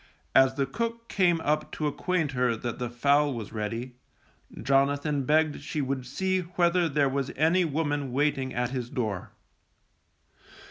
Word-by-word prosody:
As 135 0 +5
the 140 -1 +1
cook 230 +5 -4
came 175 -4 +3
up 150 0 0
to 155 - -2
acquaint 160 +1 0
her 125 -3 +1
that 120 +1 -5
the 125 -1 -2
fowl 140 +3 +2
was 110 -3 -7
ready, 115 +4 -4 0.6
Jonathan 140 +1 +1
begged 155 +1 +2
she 155 - -4
would 135 -2 -2
see 185 +8 0
whether 175 -1 +1
there 145 -1 +2
was 135 0 -2
any 165 +5 +3
woman 145 -3 -1
waiting 135 -1 0
at 120 0 -1
his 125 -3 -3
door. 105 -8 -3
140 Hz, 150 wpm, -27 LUFS, 125-160 Hz, 0.6 s, As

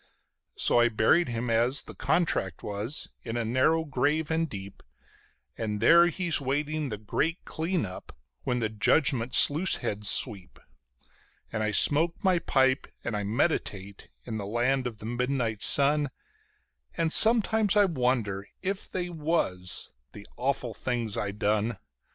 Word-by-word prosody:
So - - +2
I 120 0 +4
buried 120 +9 +2
him 120 0 -3
as 120 +5 +2
the - - -11
contract 95 - -1
was 105 +7 -4
in 115 +1 -5
a 120 - -2
narrow 130 +8 +2
grave 150 +3 -1
and 165 0 0
deep, 100 -1 -9 0.8
And 105 -2 -3
there 170 +10 +6
he's 175 -3 0
waiting 145 +2 -2
the 105 - -5
Great 155 - -2
Clean 165 - -2
up, 90 -1 -10 0.2
when 125 - -2
the 110 - 0
Judgment 120 +2 +1
sluice 160 +6 +5
heads 105 -4 -1
sweep; 100 - +1 1.0
And 110 - -2
I 110 - 0
smoke 155 - +3
my 185 -3 +3
pipe 130 -3 +1 0.2
and 120 - -3
I 105 - -2
meditate 100 - -2 0.2
in 115 -3 -5
the 100 - -5
light 125 +4 0
of 115 -3 -7
the 105 - -10
Midnight 120 -2 -2
Sun, 145 +1 +3 0.9
And 165 -1 0
sometimes 220 -2 +4
I 205 - +6
wonder 125 - -1
if 195 +1 -3
they 180 -1 -3
was, 150 - -1 0.2
the 105 - -11
awful 130 -2 -2
things 120 -4 -3
I 105 - -2
done. 105 +2 -1
125 Hz, 150 wpm, -27 LUFS, 110-160 Hz, 1.0 s, there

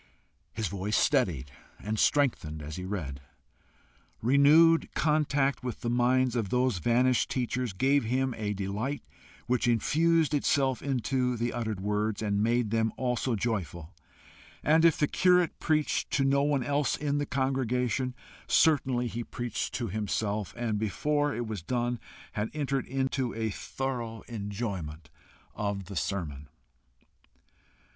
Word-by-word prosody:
His 110 -1 -2
voice 100 +3 -1
steadied 85 - +1 0.3
and 105 +1 -3
strengthened 115 - +1
as 75 +1 -6
he 90 - -5
read. 75 -9 -4 1.0
Renewed 150 +6 +5
contact 145 -3 +1
with 125 -3 -5
the 120 - -1
minds 125 +1 +2
of 110 -5 -1
those 125 -4 +1
vanished 125 +6 +2
teachers 125 -1 -1
gave 135 +7 +2
him 130 +2 0
a 105 -2 -2
delight 105 +9 -3 0.4
which 125 0 +1
infused 160 +7 +2
itself 135 -2 +1
into 125 -1 0
the 120 +1 -1
uttered 110 -5 -3
words, 105 +1 -1
and 100 -1 0
made 115 0 +1
them 110 -1 +1
also 125 -1 0
joyful; 95 -7 -3 0.7
and 160 +2 +4
if 165 - +5
the 150 - +3
curate 180 -1 +3
preached 155 -2 0
to 140 - +1
no 140 +1 +3
one 145 -2 +1
else 145 +2 0
in 145 -1 -1
the 145 - -2
congregation, 130 -1 0 0.3
certainly 130 -6 +3
he 120 0 -3
preached 120 -1 -4
to 120 - -2
himself, 105 0 -2
and 115 -3 -1
before 145 +7 0
it 120 - -2
was 110 -4 -5
done 120 +5 -1 0.3
had 105 +1 -2
entered 140 -3 -1
into 135 -1 -1
a 110 -1 -1
thorough 120 -1 -4
enjoyment 100 -9 -5 0.4
of 100 -2 -3
the 100 - -8
sermon. 75 -3 -3
120 Hz, 135 wpm, -29 LUFS, 105-135 Hz, 1.0 s, Renewed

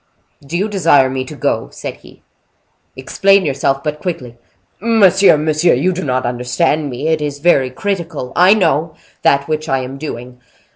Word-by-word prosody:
"Do 150 +5 -4
you 200 +4 0
desire 165 -10 +3
me 130 0 -3
to - - -10
go?" - - -2
said - - -8
he. - - -19 0.7
"Explain 195 +8 +2
yourself—but 140 +1 -1
quickly." 125 -10 -5 0.4
"Monsieur, 200 -6 +4
monsieur, 155 +2 +2
you 180 +9 0
do 185 - -5
not 130 -3 -1
understand 125 +5 -1
me. 130 +4 -4
It 160 -1 0
is 145 -1 -3
very 145 -4 +2
critical—I 180 +2 0
know—that 155 -4 0
which 155 0 -3
I 135 -1 0
am 130 +2 -7
doing. 125 -4 -8
150 Hz, 150 wpm, -16 LUFS, 130-175 Hz, 0.7 s, Monsieur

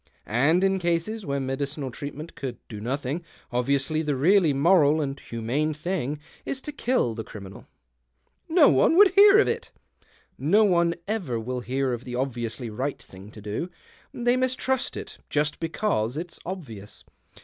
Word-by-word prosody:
And 145 - +3
in 195 0 +2
cases 175 +5 -1
where 140 0 0
medical 135 +1 -3
treatment 145 +5 -7
could 130 -4 -5
do 105 -2 -8
nothing, 140 +7 -2 0.3
obviously 135 +5 +1
the 150 -3 -1
really 170 +4 +4
moral 155 +1 +4
and 140 -2 -2
humane 130 +7 -2
thing 155 -3 -2 0.3
is 265 - -3
to 300 - -6
kill 250 - 0
the 110 0 -5
criminal." 100 -3 -10 0.4
" 65 - -45
No 295 - +9
one 330 - +4
would 405 0 +9
hear 400 +1 +7
of 430 - +5
it." 465 0 -2 0.4
" - - -34 0.2
No 220 - +7
one 170 -3 +3
ever 180 - -2
will 125 +3 -3
hear 130 +1 -1
of 120 0 -5
the 125 -1 -6
obviously 120 -2 -3
right 130 +6 -3
thing 95 +2 -13
to 105 -1 -12
do 105 - -3 0.2
— - - -29
they 245 0 +1
mistrust 255 0 0
it - - -8
just 150 0 0
because 160 - -1
it's 170 +1 -6
obvious. 115 - -7
145 Hz, 170 wpm, -26 LUFS, 125-185 Hz, 0.4 s, No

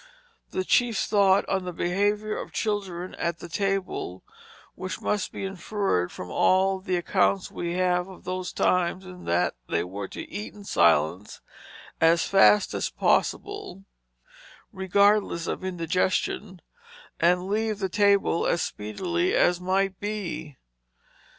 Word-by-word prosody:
The 185 - -2
chief 235 +3 +2
thought 200 -2 +3
on 190 -1 0
the 180 - -4
behavior 205 +5 0
of - - -6
children 195 -5 -3
at 170 -1 -1
the 175 - -9
table, 195 - -2 0.5
which 185 +1 -5
must 205 -2 -1
be - - -5
inferred 195 - -1
from 90 -1 -8
all 190 - +3
the 185 -1 -2
accounts 185 +2 +1
we 170 0 -3
have 180 0 +1
of 190 -2 -13
those 185 0 -4
times 180 +1 +1
is 180 -1 -11
that 85 +1 +1 0.2
they 85 - +1
were 95 +2 -6
to - - -8
eat 210 0 -7
in 205 - -11
silence, 85 - +2 0.6
as 165 +1 +4
fast 200 +1 +5
as - - -1
possible 405 - -1 0.9
(regardless 195 -2 +2
of - - -4
indigestion), 185 +2 -1 0.6
and 180 +2 +3
leave 215 +1 0
the 195 -1 -1
table 200 -3 +2
as 170 - +1
speedily 170 - -2
as 175 0 +3
might 190 +1 0
be. 170 - -5
185 Hz, 135 wpm, -26 LUFS, 170-200 Hz, 0.9 s, fast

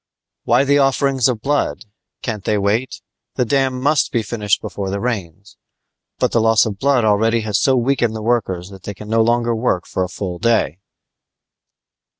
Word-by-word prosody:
"Why - - +4
the 140 +1 +3
offerings 135 -2 +2
of 115 -4 -2
blood? 145 -4 -1 0.4
Can't 110 -5 -4
they 105 +1 0
wait? 105 +6 -1 0.3
The 125 - +1
dam 130 0 0
must 145 +1 +1
be 115 - 0
finished 105 -1 0
before 100 -1 -5
the 100 +1 -2
rains; 100 -5 -5 0.6
but - - 0
the 115 - +2
loss 115 0 +4
of 100 -3 -5
blood 135 -4 +2
already 110 +2 +2
has 105 -2 0
so 135 - +3
weakened 120 -2 +1
the 110 - -5
workers 95 -6 -1
that 95 -1 -12
they 100 +2 -7
can 105 +2 -10
no 115 +1 +3
longer 120 +1 +1
work 110 -6 0
for 95 - -2
a 90 - -4
full 90 -2 -5
day." 110 -8 +1
115 Hz, 180 wpm, -19 LUFS, 100-125 Hz, 0.6 s, Why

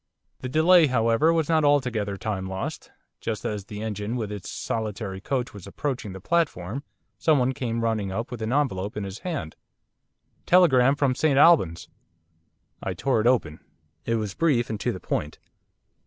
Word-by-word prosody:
The 130 - -5
delay, 160 +3 +5
however, 115 +4 +3
was 165 -3 +1
not 160 -2 +3
altogether 125 -9 +1
time 95 -3 -3
lost. 95 0 -5 0.3
Just 110 -2 -4
as 105 -2 -3
the 105 +1 -7
engine 105 +1 -3
with 110 -4 -3
its 100 -3 -6
solitary 105 -3 -4
coach 125 +3 -2
was 100 -2 -10
approaching 125 -1 -4
the 95 - -8
platform 135 - -1 0.4
someone 135 -5 +3
came 115 -3 -2
running 110 -4 -1
up 115 +6 -4
with 120 -2 -6
an 110 +1 -2
envelope 110 -9 -1
in 105 - -2
his 100 +2 -6
hand. 155 - -4 0.9
'Telegram 140 -7 +5
from 140 -3 +1
St 140 +1 +1
Albans.' 140 - +4 0.9
I - - -3
tore 130 -5 +1
it 115 - +2
open. 80 -12 +1 0.4
It 115 - 0
was 105 -4 -2
brief 125 - +1
and 110 - -3
to - - 0
the - - -6
point. 75 +1 -3
115 Hz, 170 wpm, -25 LUFS, 100-140 Hz, 0.9 s, delay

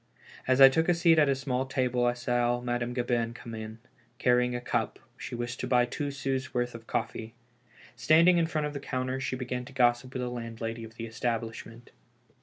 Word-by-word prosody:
As 130 +1 +3
I 135 - +11
took 160 +6 +1
a 175 - +4
seat 165 -1 +4
at 145 -2 +4
a 135 - +3
small 130 -1 -2
table, 125 -2 0
I 120 - +2
saw 120 0 0
Madame 120 0 -2
Gabin 120 -2 -1
come 115 -1 -9
in, 110 0 -7 0.4
carrying 125 0 +2
a - - -2
cup; 120 - -2 0.2
she - - -7
wished 120 +1 -4
to 125 - -3
buy 125 -1 +4
two 145 +4 -3
sous' 135 -2 -3
worth 120 0 0
of 115 -1 -11
coffee. 115 +1 -3 0.6
Standing 165 +9 +5
in 165 - +2
front 155 -2 -1
of 150 - -4
the 140 - -4
counter, 130 -1 -3
she 135 -1 -2
began 125 -1 -4
to 135 - -12
gossip 125 0 +2
with 125 - -3
the 125 - -2
landlady 115 -1 -5
of 110 0 -11
the 115 - -5
establishment. 115 0 -4
125 Hz, 210 wpm, -29 LUFS, 120-135 Hz, 0.6 s, I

